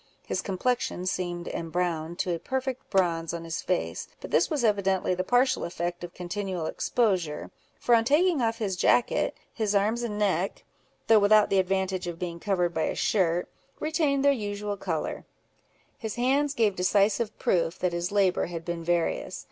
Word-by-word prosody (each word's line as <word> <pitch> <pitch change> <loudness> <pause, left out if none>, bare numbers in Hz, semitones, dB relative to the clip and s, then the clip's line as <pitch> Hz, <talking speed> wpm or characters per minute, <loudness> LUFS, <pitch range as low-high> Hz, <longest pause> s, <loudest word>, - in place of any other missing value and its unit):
His - - -2
complexion 195 -1 -1
seemed 175 -2 -2
embrowned 170 -1 -2
to 180 - 0
a 170 - -3
perfect 265 +2 -3
bronze 170 -4 +1
on 170 - -6
his 165 -1 -4
face; 180 - -2
but - - -9
this - - +3
was 300 -6 -1
evidently 195 -4 +2
the 185 0 -1
partial 245 +6 +2
effect 175 0 -4
of 175 0 -8
continual 180 -1 -3
exposure, 180 -8 0 0.3
for 240 - +2
on 230 -1 +5
taking 300 +4 +3
off 225 -1 0
his 200 -4 -2
jacket, 235 +6 +2 0.2
his 215 -3 -1
arms 215 +4 +2
and 220 -3 -3
neck, 195 -2 0 0.4
though 225 -1 +6
without 210 +1 +5
the 195 - +4
advantage 190 -1 0
of 170 -1 -4
being 170 -1 -5
covered 180 -3 0
by 160 -1 0
a - - -2
shirt, 175 -3 +1 0.3
retained 300 -3 +1
their 280 - +7
usual 205 -4 -3
colour: 175 -5 -3 0.8
his 220 -3 -4
hands 275 +4 +1
gave 215 -4 +2
decisive 200 +4 +2
proof 170 0 +1
that 180 -1 -1
his 170 +2 -2
labour 195 -3 +2
had 165 -1 -6
been 170 -1 -4
various. 170 0 -1
190 Hz, 170 wpm, -27 LUFS, 175-225 Hz, 0.8 s, their